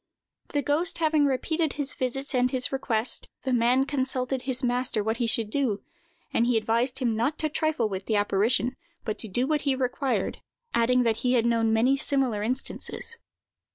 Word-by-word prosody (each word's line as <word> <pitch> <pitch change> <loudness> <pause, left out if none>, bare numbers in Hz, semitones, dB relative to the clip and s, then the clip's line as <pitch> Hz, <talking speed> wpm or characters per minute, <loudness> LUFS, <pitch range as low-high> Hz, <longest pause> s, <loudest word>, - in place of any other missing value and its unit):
The 290 -1 -1
ghost 310 +6 +1
having 310 -2 +3
repeated 310 +4 0
his 285 -2 -2
visits 270 +2 -3
and 250 0 +3
his 255 -1 0
request, 240 -3 -2 0.2
the 260 - -1
man 245 +3 +3
consulted 260 -2 0
his 260 0 0
master 245 -3 +1
what 220 +2 -1
he 235 - 0
should 225 -2 +2
do, 250 -7 0 0.5
and 235 - +2
he 245 -2 +3
advised 230 +3 0
him 240 -4 0
not 240 +7 0
to 310 - 0
trifle 305 -6 0
with 190 -2 -5
the 220 - +1
apparition, 210 +5 +1 0.3
but 215 - -3
to 220 - -4
do 240 +6 0
what 300 +1 0
he 275 -2 +1
required, 260 +1 -1 0.3
adding 250 +2 +3
that 225 -2 +1
he 250 +2 +1
had 235 -2 +3
known 230 -1 +2
many 245 +5 +3
similar 265 -7 0
instances. 260 - -3
250 Hz, 185 wpm, -26 LUFS, 230-275 Hz, 0.5 s, having